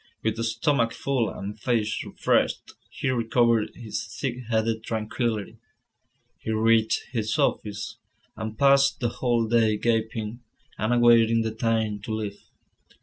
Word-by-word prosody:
With 110 +1 -1
stomach 115 +1 +1
full, 130 -5 0
and 105 +2 -7
face 110 -2 0
refreshed, - - 0 0.2
he - - -3
recovered 115 -2 +2
his 115 -3 -5 0.2
thick 125 -3 -2
headed 110 0 0
tranquillity. 110 -1 -3 0.8
He - - -7
reached 110 0 +2
his 110 -3 -1
office, 105 -2 -1 0.4
and 110 -1 -6
passed 140 +1 +4
the 120 - 0
whole 120 -1 0
day 110 -2 +3
gaping, 110 0 -1 0.4
and 110 +2 0
awaiting 115 -1 +5
the 110 -1 -3
time 110 -2 0
to 110 +2 -4
leave. 105 -2 -5
115 Hz, 130 wpm, -25 LUFS, 110-120 Hz, 0.8 s, awaiting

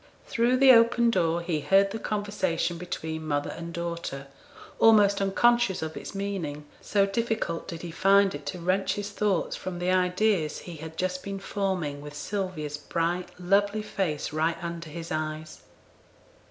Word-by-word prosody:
Through 240 +1 +2
the 265 0 +8
open 235 0 +5
door 170 -3 +1
he 170 -3 -1
heard 195 +5 +3
the 220 - -4
conversation 205 -6 -1
between 160 -2 -5
mother 145 -1 -1
and 170 0 -7
daughter, 170 -5 -4 0.5
almost 205 -3 +5
unconscious 220 0 +3
of 160 0 -5
its - - -7
meaning, 180 -7 -4 0.2
so 200 -1 +2
difficult 220 -5 -2
did 165 -1 -7
he 170 - -5
find 195 +2 +4
it - - -8
to 185 - -3
wrench 185 +3 0
his 205 0 -4
thoughts 205 -3 0
from 185 -1 -5
the 180 +1 0
ideas 180 -2 +1
he 175 -2 -9
had 160 +1 -9
just 185 +1 -1
been 195 0 -5
forming 185 -8 -2
with 145 0 -9
Sylvia's 175 -6 -3
bright 170 +4 -2
lovely 200 +3 +2
face 160 -9 -2
right 160 +2 +1
under 170 -1 -5
his 165 +2 -7
eyes. 155 0 -4
180 Hz, 160 wpm, -27 LUFS, 165-200 Hz, 0.5 s, the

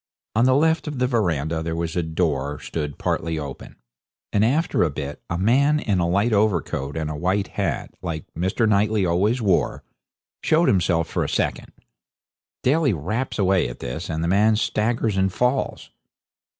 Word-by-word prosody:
On 115 +3 +4
the 130 0 +4
left 160 +3 +2
of 150 -2 -4
the 125 - +2
verandah 85 - 0
there 80 0 -3
was 85 0 -3
a 90 - +1
door 75 -4 -1
stood 75 -3 -4
partly 80 -1 -1
open, 70 -3 -7 0.6
and 105 - +3
after 145 +9 +1
a 85 - +3
bit 70 0 -6
a 85 - -1
man 140 +10 +3
in 100 -9 0
a 85 -1 +1
light 100 +6 +2
overcoat 85 -9 0
and 80 -1 -2
a 75 - -4
white 95 +5 0
hat, - - -2
like 80 -3 -4
Mr. 95 +7 0
Knightley 105 -1 +2
always 105 +8 +1
wore, 95 -4 +1 0.6
showed 165 +2 +3
himself 85 -3 +2
for - - -1
a - - -3
second. - - -2 0.9
Daly 140 -1 +3
raps 110 - -3
away 95 - +2
at - - -8
this, 70 +8 -5
and 80 0 -2
the - - 0
man 105 +4 +4
staggers 110 -1 0
and 95 0 +2
falls. 125 +6 -1
95 Hz, 175 wpm, -23 LUFS, 80-115 Hz, 0.9 s, On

